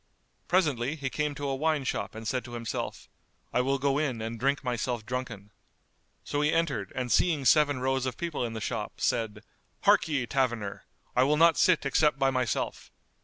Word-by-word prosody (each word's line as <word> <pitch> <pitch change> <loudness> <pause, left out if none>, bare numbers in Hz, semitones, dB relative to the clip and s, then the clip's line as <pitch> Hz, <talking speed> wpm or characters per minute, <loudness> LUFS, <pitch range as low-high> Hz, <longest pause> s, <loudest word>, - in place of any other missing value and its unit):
Presently, 150 -7 +1
he 135 -4 -4
came 150 +3 -1
to 145 0 -4
a 135 - 0
wine 155 0 +1
shop 100 -6 -3
and 110 0 -6
said 130 +2 -1
to 120 - -9
himself, 115 -2 -4 0.5
"I 125 - +3
will 135 +2 +1
go 140 +1 +1
in 135 -7 -1
and 115 +1 -5
drink 140 +3 +1
myself 120 -2 -2
drunken." 120 -5 -5 0.7
So 145 - -1
he 150 0 +2
entered 140 - 0
and 125 -2 -2
seeing 155 -6 +2
seven 145 -1 +4
rows 130 0 0
of 130 - -4
people 170 -6 -3
in 115 -1 -3
the 110 - -5
shop, 110 -2 -3
said, 110 -1 -1 0.4
"Harkye, 145 -6 +3
taverner! 120 -7 -1 0.3
I 125 - +4
will 145 +3 +3
not 165 0 +6
sit 170 -5 +3
except 150 +1 +3
by 135 0 +2
myself." 125 -5 -2
130 Hz, 185 wpm, -28 LUFS, 120-145 Hz, 0.7 s, not